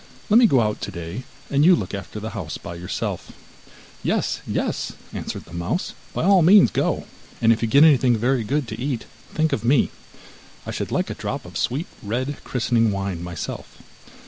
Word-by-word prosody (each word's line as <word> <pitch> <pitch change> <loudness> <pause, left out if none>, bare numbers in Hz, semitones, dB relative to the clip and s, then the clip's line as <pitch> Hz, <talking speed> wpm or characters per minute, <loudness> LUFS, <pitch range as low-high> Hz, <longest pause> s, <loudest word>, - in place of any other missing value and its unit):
Let 220 - +8
me 240 - +7
go 130 - +4
out 105 -1 -1
today, 85 +9 -6 0.3
and 140 +1 +3
you 180 +3 +7
look 95 - -4
after 100 +2 -6
the 110 +1 -5
house 95 -8 -5
by 85 - -8
yourself.' 85 +1 -4 0.7
'Yes, - - 0
yes,' - - -2 0.2
answered - - -5
the 85 - -15
mouse, 85 - -2 0.2
'by - - -2
all 190 0 +6
means 190 +5 +7
go, - - 0 0.3
and 115 0 +5
if 115 - -4
you 115 - +1
get 140 +6 +6
anything 130 -6 +5
very 125 +2 +1
good 140 +4 -1
to 110 +2 -6
eat, 130 -4 -2 0.3
think 160 0 +1
of 110 - -1
me. 125 +2 +3 0.7
I - - -4
should - - -4
like - - 0
a - - -2
drop - - -4
of - - -12
sweet 135 +8 -1 0.2
red 130 +7 -2
christening 115 -2 +1
wine 100 -3 -3
myself. 85 -3 -6
120 Hz, 190 wpm, -23 LUFS, 100-145 Hz, 0.7 s, Let